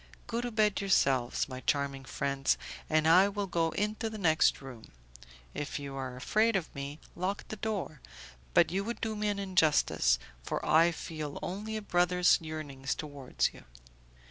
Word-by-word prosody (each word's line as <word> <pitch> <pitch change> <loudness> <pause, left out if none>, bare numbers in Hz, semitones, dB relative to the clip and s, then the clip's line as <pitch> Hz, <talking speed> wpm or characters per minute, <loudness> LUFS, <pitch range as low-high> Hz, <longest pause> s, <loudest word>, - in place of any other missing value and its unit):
Go 235 0 -2
to 245 - -3
bed 215 -3 +2
yourselves, 135 -10 +2
my 130 -2 -6
charming 140 0 -1
friends, 140 0 0 0.3
and 155 0 +3
I 185 +5 +7
will 205 0 -2
go 170 -3 0
into 210 +5 -2
the 220 - -7
next 160 -5 +3
room. 130 -5 -11 0.6
If 145 - -4
you 140 -1 -6
are 130 -2 -4
afraid 215 - +2
of 185 -4 -2
me, 140 +2 -6 0.2
lock 190 +3 -3
the - - -4
door, 200 -9 -4 0.5
but - - +5
you 195 +2 0
would 235 +3 -4
do 220 -1 -2
me 210 0 -1
an 205 -1 0
injustice, 185 -6 +3 0.2
for - - -3
I 165 +2 +5
feel 155 -3 -6
only 210 +4 -4
a 215 - -6
brother's 180 -1 +3
yearnings 145 -4 -4
towards 145 -4 -2
you." - - -14
165 Hz, 170 wpm, -31 LUFS, 140-205 Hz, 0.6 s, I